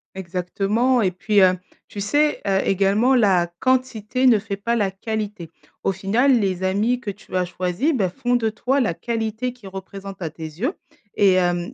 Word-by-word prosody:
Exactement 195 +7 0
et 195 - +3
puis, 200 +4 -2
hem, 185 -1 +5 0.3
tu 205 - -8
sais, 295 +9 +1
heu, 195 -1 +2
également 200 +7 +3
la 190 -7 +3
quantité 255 -1 +1
ne 235 -3 +6
fait 200 -1 -5
pas 235 +4 -1
la 205 -4 +1
qualité. 205 -3 -5 0.3
Au - - +2
final, 230 +8 +2
les 190 -3 -1
amis 210 +6 +1
que 240 -5 -6
tu 200 -1 -8
as 180 0 +2
choisi, 180 - -1
bah, 200 -9 +1
font 245 +6 -1
de 225 -2 +1
toi 250 +5 0
la 225 -9 +1
qualité 230 +4 -3
qui 245 -5 -18
représente 195 0 -8
à 165 - -2
tes 160 +1 -11
yeux 175 - -3 0.4
et 195 -2 +5
hem, 175 -1 0
200 Hz, 185 wpm, -22 LUFS, 190-240 Hz, 0.4 s, ne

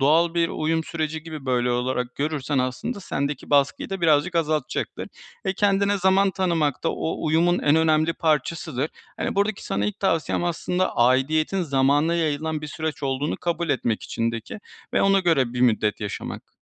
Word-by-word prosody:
doğal 165 +5 +3
bir 170 -1 +2
uyum 160 +1 -1
süreci 160 -1 -3
gibi, 155 -4 -8
böyle, 125 -1 +1
olarak 125 0 -1
görürsen 145 -1 -1
aslında 130 - -2
sendeki 140 -5 -3
baskıyı 140 +4 +2
da 195 -1 -3
birazcık 165 +1 +3
azaltacaktır 155 -3 -1 0.4
ve 190 - +2
kendine 200 0 +2
zaman 190 +1 +3
tanımak 170 -6 0
da - - +3
o 160 - -3
uyumun 170 +3 +3
en 145 +1 +3
önemli 160 0 +3
parçasıdır. 155 -2 -1 0.3
Hani, - - -2
buradaki 200 +1 0
sana 100 +1 -1
ilk 105 - -4
tavsiyem 165 -3 0
aslında 180 +2 -1
aidiyetin 150 +9 +2
zamana 145 +2 +2
yayılan 160 -2 0
bir 155 -1 -3
süreç 155 +1 -4
olduğunu 135 +2 -1
kabul 170 -1 -2
etmek 120 -5 0
içindeki 115 - -3 0.3
ve - - +3
ona 195 0 +4
göre 145 -9 +2
bir 125 - -3
müddet 110 -4 +2
yaşamak. 105 -2 -6
155 Hz, 160 wpm, -24 LUFS, 135-170 Hz, 0.4 s, ona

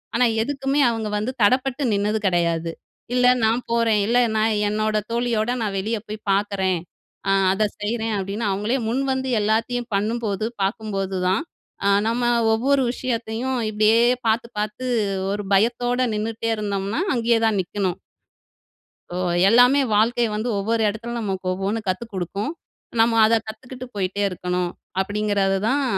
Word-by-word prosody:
ஆனா 250 - +4 0.2
எதுக்குமே 275 +2 -1
அவுங்க 225 -2 -3
வந்து 220 +5 -2
தடப்பட்டு 255 +5 +2
நின்னது 205 +2 0
கெடையாது. 170 -2 0 0.4
இல்ல 250 0 +4 0.2
நான் 225 +3 +2
போறேன், 230 -2 +3
இல்ல 240 +2 +2 0.2
நான் 220 +1 +2
என்னோட 215 +1 0
தோழியோட 235 -1 0
நான் 205 -3 -2
வெளிய 220 +4 -1
போய் 215 +1 -5
பார்க்குறேன், 195 -2 +1 0.5
அ - - +4 0.2
அத 205 +3 +1 0.2
செய்றேன் 225 +1 -1
அப்பிடின்னு 200 +3 -2
அவங்களே 210 +6 0
முன்வந்து 265 +2 -1
எல்லாத்தையும் 230 +3 0
பண்ணும்போது, 215 0 -1 0.2
பார்க்கும்போது 195 -1 -2
தான், 190 +3 +2 0.4
அ - - +4 0.2
நம்ம 235 +2 0 0.3
ஒவ்வொரு 270 +4 +2
விஷயத்தையும் 245 0 -2
இப்பிடியே 215 +1 +3 0.3
பார்த்து, 230 +1 0
பார்த்து 215 +5 -3 0.5
ஒரு 205 0 -3
பயத்தோட 245 +4 +1 0.2
நின்னுட்டே 225 +2 -2
இருந்தம்ன்னா, 200 - -2
அங்கே 235 -1 +2
தான் 210 -3 +1
நிக்கணும். 185 -1 -3 1.2
"ஓ! - - -1 0.3
எல்லாமே 245 +5 +6
வாழ்க்கை 230 +3 +3
வந்து 215 +3 -2
ஒவ்வொரு 225 +3 0
இடத்துல 225 +3 -5
நமக்கு 195 -3 -3
ஒவ்வொண்ணு 195 +4 -2
கத்து 185 +4 -1
குடுக்கும். 195 - -3 0.5
நம்ம 225 0 +4
அத 225 - +3
கத்துக்கிட்டு 250 +4 -8
போயிட்டே 200 0 -2
இருக்கணும்." 180 -1 -2 0.3
அப்படீங்கிறது 205 -1 0
தான் 280 +3 +1
220 Hz, 135 wpm, -22 LUFS, 200-235 Hz, 1.2 s, எல்லாமே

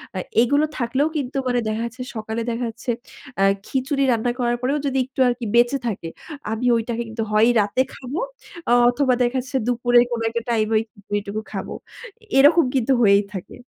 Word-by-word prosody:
আ 185 - -1 0.2
এগুলো 285 +5 +3
থাকলেও 260 +5 +1
কিন্তু 275 -1 -3
মানে 245 -1 +1
দেখা 215 +1 -1
যাচ্ছে, 250 +2 -7
সকালে 220 +1 -3
দেখা 240 +2 -2
যাচ্ছে 240 +2 -4 0.5
আ - - +5 0.2
খিচুড়ি 275 +1 0
রান্না 240 +1 +1
করার 240 0 +1
পরেও 270 +4 +1
যদি 270 -1 0
একটু 265 +1 -12
আরকি 240 -1 -1
বেঁচে 240 +3 +4
থাকে। 175 -6 -4 0.4
আমি 225 +3 -2
ওইটাকে 230 +1 -2
কিন্তু 225 0 -3
হয় 215 +2 +5
রাতে 205 +5 +1
খাবো 270 +4 -5 0.5
আ - - +3 0.2
অথবা 255 +1 +2
দেখাচ্ছে 260 +2 -2
দুপুরে 245 0 +3
কোন 235 -1 -2
একটা 235 +1 -2
টাইমে 220 -1 +1
ওই 215 - +1
খিচুড়িটুকু 205 0 -4
খাবো। - - -5 0.6
এরকম 315 +5 +7
কিন্তু 260 0 +1
হয়েই 200 -1 +5
থাকে। 190 -3 -7
240 Hz, 175 wpm, -22 LUFS, 225-260 Hz, 0.6 s, এরকম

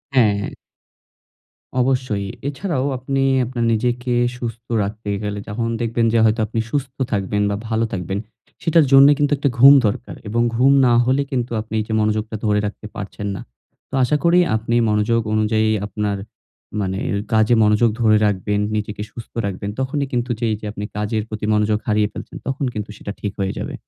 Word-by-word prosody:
হ্যাঁ, 110 -5 +5
হ্যাঁ। - - -3 1.3
অবশ্যই 125 -6 0 0.2
এছাড়াও 145 -1 -2
আপনি 135 +2 -1 0.2
আপনার 120 -1 -2
নিজেকে 120 +2 0 0.2
সুস্থ 115 -1 -6 0.2
রাখতে 105 +1 -5
গেলে 105 0 -3
যখন 115 +2 -2
দেখবেন 115 0 +1
যে 115 - +4
হয়তো 110 +1 +2
আপনি 115 +2 -3
সুস্থ 135 -2 -2 0.2
থাকবেন 105 0 0
বা 100 - -1
ভালো 115 0 +1
থাকবেন 95 +1 -3 0.4
সেটার 165 -1 +4
জন্য 135 0 +9
কিন্তু 145 -1 +1
একটা 140 0 +1
ঘুম 135 +3 +10
দরকার 105 - -4
এবং 115 +3 0
ঘুম 130 +4 +4 0.2
না 120 - +4
হলে 130 +3 +2
কিন্তু 125 -3 -2
আপনি 110 +1 -11
এই - - 0
যে 110 - -3
মনোযোগটা 110 +1 0
ধরে 105 -1 +2
রাখতে 105 +1 -6
পারছেন 100 0 -5
না। - - -6 0.5
তো - - -25
আশা 140 +4 +2
করি 170 +1 +5 0.2
আপনি 115 +2 -1
মনোযোগ 105 +2 +2
অনুযায়ী 110 0 +2 0.2
আপনার 105 0 -2 0.6
মানে, 95 -1 -2
মানে 100 - -1
কাজে 110 +2 +4
মনোযোগ 105 +2 +4
ধরে 110 -2 +5
রাখবেন 105 0 0 0.2
নিজেকে 105 -1 -3
সুস্থ 115 - -10
রাখবেন 100 0 -4
তখনই 140 +2 -1
কিন্তু 120 0 -1
যেই 115 -2 0
যে 105 - -9
আপনি 105 0 -5
কাজের 105 +1 -1
প্রতি 110 -1 -4
মনোযোগ 105 0 +2
হারিয়ে 105 -1 +2
ফেলছেন - - -8
তখন 135 +1 -1
কিন্তু 105 -1 -5
সেটা 100 - -6
ঠিক 105 - -2
হয়ে 95 -1 -1
যাবে। - - -5
110 Hz, 180 wpm, -20 LUFS, 105-125 Hz, 1.3 s, ঘুম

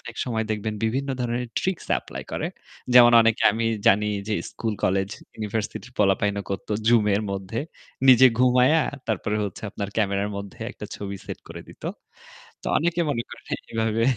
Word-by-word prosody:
অনেক 115 - -9
সময় 115 -3 -1
দেখবেন 110 0 -2
বিভিন্ন 130 +5 -1
ধরনের 120 0 -1
ট্রিকস 190 -2 -2
এপ্লাই - - -8
করে। - - -2 0.5
যেমন 120 -1 +9
অনেকে 115 -1 +2
আমি 115 +1 -1 0.2
জানি 105 +2 +5 0.2
যে 105 - +1 0.2
স্কুল, 110 -2 -3
কলেজ, 95 +1 +1 0.3
ইউনিভার্সিটির 110 +3 -4
পোলাপাইন 100 0 +2 0.2
করতো 100 +2 -3
Zoom-এর 105 -3 +4
মধ্যে, 95 +3 -4 0.5
নিজে 130 0 +9
ঘুমিয়ে 125 +5 +5 0.3
তারপরে 105 0 -1
হচ্ছে 100 - -6
আপনার 100 -1 -4
ক্যামেরার 100 -1 +1
মধ্যে 100 +4 -8
একটা 105 - -8
ছবি 100 -1 -5
সেট - - -6
করে - - -8
দিত। - - -15 0.8
তো - - -5
অনেকে 170 +2 +1
মনে 115 -5 -1
করেন - - -12 0.3
এভাবে 115 0 0
110 Hz, 155 wpm, -24 LUFS, 100-120 Hz, 0.8 s, যেমন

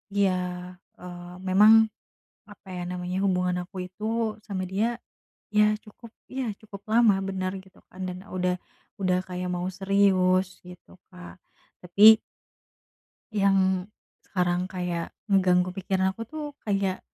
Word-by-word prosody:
Iya, 200 -2 +3 0.7
eee, 175 0 -9 0.2
memang 210 +4 +7 0.8
apa 205 -1 -16
ya - - -4
namanya 180 0 -3
hubungan 180 -1 +1
aku 190 - -25
itu 185 +3 -13 0.4
sama 195 -3 -3
dia 200 +4 +1 0.7
ya 210 - +7 0.2
cukup 220 +2 -14 0.2
ya 265 0 -3 0.2
cukup 205 -2 -11
lama 230 -2 +6 0.2
bener 185 -1 -2
gitu 190 -1 -22
kan 185 - -11
dan 180 - -6 0.2
udah 180 0 +1 0.5
udah 185 -1 +2
kayak 180 0 -4
mau 175 +1 -2
serius 190 -1 +3 0.2
gitu 180 0 -14 0.2
Kak 180 -1 -11 0.5
tapi 205 +5 +8 1.1
yang 195 -2 +2 0.4
sekarang 180 -1 0
kayak 180 -2 -4 0.2
ngeganggu 180 -2 +3
pikiran 190 0 0
aku 225 +3 -8
tuh 310 +3 -6 0.2
kayak 195 -2 0
185 Hz, 125 wpm, -26 LUFS, 180-200 Hz, 1.1 s, tapi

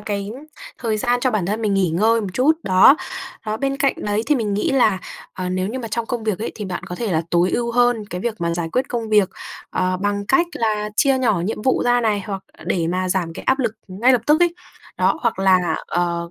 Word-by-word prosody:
cái 200 0 -4 0.5
thời 225 -3 -1
gian 245 +1 +1
cho 255 - +2
bản 205 -6 -1
thân 215 +3 -2
mình 205 -2 +1
nghỉ 185 -4 +2
ngơi 220 +7 +3
một 205 - -4
chút, 260 - +4
đó. 190 +10 +6 0.5
Đó, 215 0 -1
bên 275 +2 -1
cạnh 275 -1 +2
đấy 210 +1 -1
thì 300 - +3
mình 210 -5 -1
nghĩ 210 - 0
là, 220 -8 +3 0.3
ờ, 185 -1 -4
nếu 185 +1 -1
như 260 +4 -4
mà 230 - -5
trong 230 +1 -2
công 240 -3 -3
việc 215 -4 -1
ấy, 225 - -4
thì 210 - -6
bạn 185 -2 -5
có 180 - -6
thể 215 -1 -3
là 160 +1 +1
tối 175 +1 +3
ưu 235 -1 -1
hơn 245 -3 +2
cái 180 +1 -4
việc 235 -1 -2
mà 170 0 0
giải 170 -1 -2
quyết 260 +2 0
công 230 -3 -3
việc, 210 -3 +4 0.4
ờ, 185 0 0
bằng 200 +1 -2
cách 350 - +3
là 210 -2 -1
chia 270 -2 +3
nhỏ 220 -9 +1
nhiệm 210 +4 -3
vụ 260 - +2
ra 245 0 +3
này, 215 -3 +1
hoặc 195 -2 -4 0.2
để 170 -3 0
mà 185 +2 -1
giảm 180 -3 -1
cái - - -8
áp 265 +1 +2
lực 235 -5 0 0.2
ngay 220 +8 +3
lập 240 -2 +2
tức 305 +3 +4
ấy. 345 0 +2 0.4
Đó, 320 - +2
hoặc 235 -5 0
là, 185 -4 +3
ờ, 170 -1 -1
210 Hz, 250 wpm, -21 LUFS, 185-240 Hz, 0.5 s, đó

